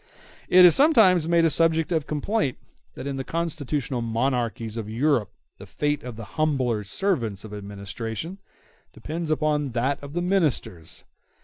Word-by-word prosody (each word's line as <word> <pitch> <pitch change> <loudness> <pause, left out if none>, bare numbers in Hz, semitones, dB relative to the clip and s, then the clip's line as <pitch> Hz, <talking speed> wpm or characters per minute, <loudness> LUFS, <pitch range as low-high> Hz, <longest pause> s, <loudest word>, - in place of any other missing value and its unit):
It 180 0 +8
is 175 - +8
sometimes 205 - +5
made 170 -1 +4
a 165 - +3
subject 165 +1 +2
of 160 -3 0
complaint 150 - -1 0.4
that - - -7
in 140 -1 -3
the 135 - -3
constitutional 145 -6 -3
monarchies 115 -1 -1
of 110 -2 -5
Europe 125 -1 +1 0.3
the - - -11
fate 145 0 -1
of 125 -4 -8
the 115 - -8 0.2
humbler 130 -8 +1
servants 115 - -2
of 110 - -10
an 105 - -5
Administration 105 - -6 0.5
depends 160 +1 -5
upon 150 -3 0
that 135 +4 -1
of 140 0 -9
the 175 - -1
Ministers. 155 - -1
145 Hz, 155 wpm, -24 LUFS, 115-165 Hz, 0.5 s, It